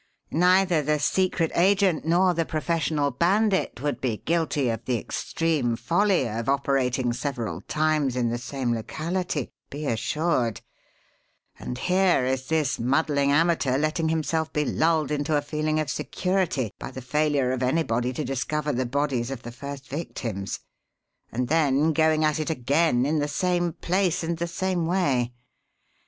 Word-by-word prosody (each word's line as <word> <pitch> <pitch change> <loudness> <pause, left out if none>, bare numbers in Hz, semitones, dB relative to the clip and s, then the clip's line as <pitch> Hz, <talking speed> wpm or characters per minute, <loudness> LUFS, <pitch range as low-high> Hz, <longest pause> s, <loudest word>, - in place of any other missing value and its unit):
Neither 180 -1 +4
the 150 +1 +1
secret 170 +1 +1
agent 190 -2 +3
nor 180 +3 +3
the 165 0 +1
professional 155 -2 0
bandit 190 - +1
would 145 -1 -2
be 120 -5 -1
guilty 160 -5 +1
of 115 0 -3
the 125 -1 +1
extreme 145 -1 -1
folly 180 - +2
of 115 +2 -3
operating 130 -3 +1
several 120 - -3
times 150 -4 +1
in 120 -2 +1
the 120 +1 -2
same 125 -1 -2
locality, 155 +6 -3 0.2
be 150 +2 -6
assured; 125 - 0 1.0
and 125 - -5
here 180 -3 +2
is 130 0 -1
this 155 -3 0
muddling 140 +2 +2
amateur 150 -4 +2
letting 155 +2 0
himself 160 0 -1
be 150 0 0
lulled 160 -2 +1
into 150 +1 +1
a - - +1
feeling 155 +1 -1
of 155 - -1
security 150 - -1
by - - -6
the 130 - -8
failure 145 -1 +1
of 130 -1 -2
anybody 125 -3 +1
to 140 +4 -3
discover 145 +3 -2
the 130 0 -1
bodies 135 -2 -1
of 135 -3 -6
the 120 - -7
first 140 +2 -8
victims, 115 - -4 0.7
and 125 +2 -1
then 155 0 +2
going 155 0 +3
at 155 0 +1
it 155 - -2
again 140 -2 +2
in 155 +2 +1
the 145 - 0
same 175 +3 0
place 180 +1 0
and 165 +1 -2
the 170 - -1
same 180 -1 -1
way. 140 -10 +1
150 Hz, 155 wpm, -25 LUFS, 130-165 Hz, 1.0 s, Neither